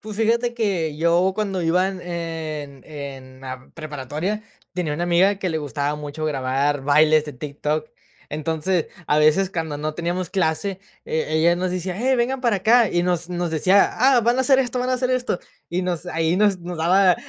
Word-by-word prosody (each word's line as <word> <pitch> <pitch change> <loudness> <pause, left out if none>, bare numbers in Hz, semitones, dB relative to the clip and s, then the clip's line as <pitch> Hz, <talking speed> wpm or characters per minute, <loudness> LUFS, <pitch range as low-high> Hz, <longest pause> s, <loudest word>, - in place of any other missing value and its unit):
Pues, 215 -1 -8
fíjate 235 +2 +1
que 185 -10 -1
yo 170 +3 +3
cuando 195 -4 -2
iba 180 +3 +2
en 190 -1 -6
en 160 -5 -5
en 135 -3 -9
la 130 -1 -8
preparatoria, 155 - -4 0.3
tenía 165 -5 -1
una 170 - -2
amiga 185 +3 +3
que 190 -2 -2
le 160 -1 -1
gustaba 145 0 -2
mucho 150 +1 -6
grabar 140 0 0
bailes 155 +2 +4
de 150 - -7
TikTok. 150 +3 -3 0.4
Entonces, 160 +3 -1 0.2
a 150 - +3
veces 155 +5 +4
cuando 160 -4 -3
no 155 +1 -3
teníamos 175 +1 -2
clase, 190 +1 -1 0.2
eh, 160 - -1
ella 160 +2 +3
nos 180 +1 -1
decía: 180 0 -3
"Hey, 260 +4 +2
vengan 250 +2 0
para 235 -5 +2
acá". 225 +3 +4
Y 175 - +1
nos 175 -1 0
nos 175 -1 -2
decía: 185 +6 +4
"Ah, 255 +1 +4
van 240 +3 +2
a - - +4
hacer 265 +1 +4
esto, 250 -1 0
van 255 - -1
a 255 - +3
hacer 255 0 -1
esto". 250 -7 0 0.3
Y 180 +2 -1
nos 180 -1 -3
ahí 165 0 0
nos 205 -2 +3
nos 175 -1 -7
daba 180 +3 +4
175 Hz, 195 wpm, -22 LUFS, 155-195 Hz, 0.4 s, bailes